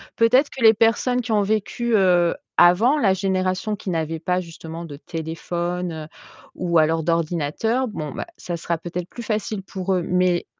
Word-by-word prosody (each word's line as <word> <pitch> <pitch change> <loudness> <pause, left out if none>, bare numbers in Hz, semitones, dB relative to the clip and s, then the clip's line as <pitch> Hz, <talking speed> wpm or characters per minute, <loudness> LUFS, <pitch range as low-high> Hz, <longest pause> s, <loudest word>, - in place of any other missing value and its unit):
Peut-être 255 +5 +4
que 250 - -6
les 220 0 +8
personnes 230 +3 +2
qui 230 -1 -5
ont 210 - +3
vécu, 220 +3 -1
heu 180 -3 +4 0.2
avant 220 +12 +5
la 200 -10 +3
génération 190 +2 -1
qui 195 - -7
n'avaient 160 -1 -2
pas 180 +3 0
justement 165 -1 -8
de 145 -3 -8
téléphone, 165 +1 -4 0.5
ou 170 -2 0
alors 160 +1 +2
d'ordinateur. 170 - 0
Bon 155 -8 -5
ben, - - -5
ça 175 - -5
sera 170 0 -2
peut-être 175 +2 -6
plus 240 - -8
facile 215 -2 -2
pour 190 0 -3
eux. 180 -2 0
Mais 180 -1 +1
180 Hz, 170 wpm, -22 LUFS, 170-215 Hz, 0.5 s, les